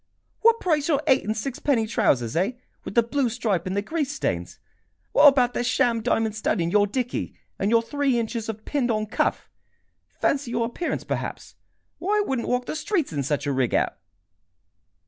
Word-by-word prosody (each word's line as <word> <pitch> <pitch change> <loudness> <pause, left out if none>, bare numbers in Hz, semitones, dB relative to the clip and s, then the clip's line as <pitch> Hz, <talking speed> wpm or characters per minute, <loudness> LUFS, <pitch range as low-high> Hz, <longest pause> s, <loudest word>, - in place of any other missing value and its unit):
"What 460 0 +4
price 310 -4 +1
your 295 -3 +1
eight 265 0 +3
and 215 +1 -1
sixpenny 260 0 0
trousers, 120 - +1
eh, 190 +8 +1 0.3
with - - -7
the 235 - +5
blue 250 +2 0
stripe 220 -7 -1
and 190 +2 -2
the 200 - 0
grease 295 +2 -2
stains? 85 - -3 0.5
What - - +7
about 255 -3 +4
the - - -1
sham 240 -2 +2
diamond 225 -2 0
stud 215 -1 0
in 170 0 0
your 205 0 +4
dickey, 245 +3 -3 0.2
and 200 - +1
your 230 0 +4
three 275 +1 0
inches 230 -1 -3
of 220 0 -6
pinned 275 -4 0
on 215 -1 0
cuff? 215 - -1 0.7
Fancy 275 -3 +1
your 235 -1 0
appearance, 245 +9 -3
perhaps! - - -5 0.5
Why, 405 +4 +1
I 415 - +3
wouldn't 260 -3 -1
walk 250 0 0
the - - -4
streets 330 - -1
in 145 - -1
such 145 +1 -1
a 145 - 0
rig 130 -3 +1
out!" - - +1
235 Hz, 190 wpm, -24 LUFS, 210-275 Hz, 0.7 s, What